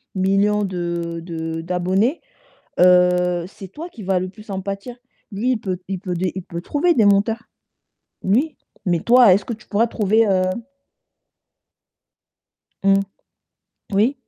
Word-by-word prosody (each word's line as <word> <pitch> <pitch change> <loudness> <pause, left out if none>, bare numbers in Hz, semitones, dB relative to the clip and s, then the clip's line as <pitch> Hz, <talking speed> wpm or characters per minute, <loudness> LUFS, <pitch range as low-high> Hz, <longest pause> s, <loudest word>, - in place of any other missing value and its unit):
millions 195 +2 +2
de 170 -3 -3
de 165 -1 -4
d'abonnés, 185 - 0 0.6
heu, 180 -1 +4
c'est 190 0 -11
toi 325 - -8
qui 225 -10 -11
va 190 -1 +1
le 185 +1 -4
plus 210 +3 -15
en 190 -1 -3
pâtir. 200 +5 -6 0.4
Lui, 215 +6 0
il 235 - -2
peut 185 -3 -3
il 190 -1 -3
peut 180 -2 -4
des 180 +1 -1
il 190 - -5
peut 170 0 -6
trouver 320 - +1
des 225 -8 +3
monteurs. 205 +3 +2 0.8
Lui, 260 +11 +1 0.3
mais 175 -2 +2
toi 240 -1 +6
est-ce 195 +1 0
que 235 - -4
tu 220 - -19
pourras 220 +3 +2
trouver 220 0 +2
heu 190 -2 +2 2.4
Mmh. 195 0 +4 0.9
Oui. 220 +8 +3
195 Hz, 145 wpm, -21 LUFS, 180-220 Hz, 2.4 s, toi